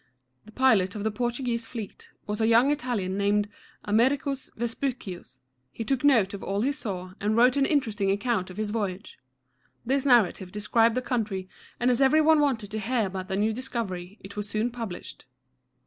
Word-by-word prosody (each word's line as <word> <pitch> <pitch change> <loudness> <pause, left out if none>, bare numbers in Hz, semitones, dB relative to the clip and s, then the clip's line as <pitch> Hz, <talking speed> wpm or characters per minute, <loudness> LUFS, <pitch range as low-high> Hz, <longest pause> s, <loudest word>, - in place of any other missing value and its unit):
The 215 - -14
pilot 220 -7 +3
of 205 - -4
the 220 - 0
Portuguese 240 0 -2
fleet 225 -5 -8 0.2
was 210 +1 -3
a 220 - +3
young 235 +5 +5
Italian 230 -9 -2
named 205 +1 +2 0.4
A 205 - -4
mer´i 260 +6 +4
cus 275 0 -4
Ves 235 0 -2
pu´cius. 195 - -5 0.3
He 230 - -5
took 265 +3 -1
note 230 -9 +4
of 200 - -6
all 200 +1 -1
he 275 - +2
saw, 190 -10 -5
and 210 +2 +1
wrote 245 +3 +5
an 275 -1 +3
interesting 225 -9 +1
account 200 -1 0
of 185 - -10
his 215 -1 -2
voyage. 200 -3 -4 0.7
This 270 +2 +1
narrative 215 -8 +3
described 225 +3 +2
the 255 - -1
country, 210 -7 -2 0.3
and 245 +1 +3
as 245 - +1
every 270 +3 +5
one 315 0 +5
wanted 240 -8 0
to 215 - -3
hear 230 0 0
about 185 -1 -5
the 190 - -2
new 215 +2 +1
discovery, 215 -6 -5
it 200 +1 -10
was 210 0 -4
soon 215 +4 -1
published. 230 - -7
225 Hz, 195 wpm, -27 LUFS, 200-255 Hz, 0.7 s, young